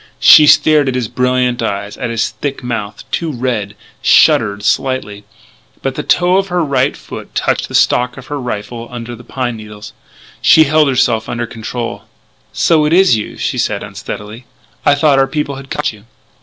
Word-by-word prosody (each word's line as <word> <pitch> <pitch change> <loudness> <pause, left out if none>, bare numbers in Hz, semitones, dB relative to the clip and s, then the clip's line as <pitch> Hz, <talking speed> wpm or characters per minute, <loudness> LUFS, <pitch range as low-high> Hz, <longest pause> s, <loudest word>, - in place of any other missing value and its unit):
She 150 - +8
stared 150 -2 +4
at 130 - -3
his 125 -3 -1
brilliant 125 0 0
eyes, 100 -2 -3
at 125 -3 -4
his 115 -1 -1
thick 140 -2 -5
mouth, 110 -4 -5
too 165 -2 -2
red 120 -6 -3 0.3
shuddered 100 0 +3
slightly. 105 -3 -1 0.6
But 135 - -1
the - - -4
toe 180 +1 +2
of 195 0 0
her 175 -2 0
right 140 -2 0
foot - - -10
touched - - 0
the - - -6
stock 125 +1 +2
of 130 - -10
her 145 0 -5
rifle 115 -1 -5
under 120 -1 -7
the 120 - -14
pine 120 -1 -4
needles. 105 -1 -11 0.5
She 160 - +6
held 155 0 +3
herself 120 -4 +1
under 120 0 -3
control. 115 +1 -6 0.5
"So 160 -2 +2
it's 180 +3 +4
you," 110 -2 -3
she - - -2
said - - -1
unsteadily. 110 +4 -8 0.4
"I 145 - +5
thought 145 -1 +3
our 135 - +3
people 140 -1 -3
had 135 0 -11
caught 150 -5 -2
you." 105 0 -17
125 Hz, 180 wpm, -15 LUFS, 115-145 Hz, 0.6 s, She